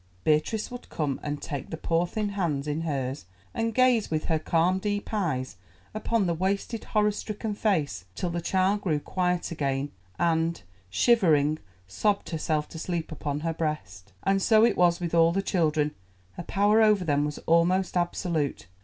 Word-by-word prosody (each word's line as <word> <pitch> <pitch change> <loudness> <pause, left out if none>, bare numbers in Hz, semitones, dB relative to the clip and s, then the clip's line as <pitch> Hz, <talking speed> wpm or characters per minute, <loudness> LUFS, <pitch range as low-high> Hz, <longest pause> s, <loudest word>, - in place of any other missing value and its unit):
Beatrice 155 +10 +1
would 245 0 -9
come 145 -4 -2
and 145 -1 -3
take 140 -5 -5
the 160 - -5
poor 165 +2 0
thin 210 +2 -2
hands 165 -8 -1
in 150 +2 -1
hers 135 - -3 0.3
and 225 0 -1
gaze 250 -2 +3
with 155 -1 -1
her 160 -1 +1
calm 170 +4 +2
deep 205 +1 -2
eyes 150 - -1 0.4
upon 215 0 0
the 170 - +1
wasted 195 +6 -2
horror 210 0 +2
stricken 210 +1 -4
face 170 - 0
till 180 - -2
the 170 0 -2
child 190 +4 +1
grew 160 -7 0
quiet 180 +2 -1
again 140 -2 -1 0.3
and, 165 - +1 0.3
shivering, 155 - +3 0.3
sobbed 200 - 0
herself 155 -2 -1
to 160 - -8
sleep 170 -1 -3
upon 145 -1 -3
her 165 0 -1
breast. 150 - -4
And 195 0 +2
so 220 +2 +5
it - - +2
was 175 -1 +3
with 170 -2 -3
all 165 0 +5
the 195 +3 0
children; 155 -6 +1 0.4
her - - -7
power 205 +5 +3
over 210 -4 +4
them 145 -2 +2
was 150 0 -3
almost 175 +4 +3
absolute. 170 - -1
170 Hz, 170 wpm, -27 LUFS, 150-200 Hz, 0.4 s, so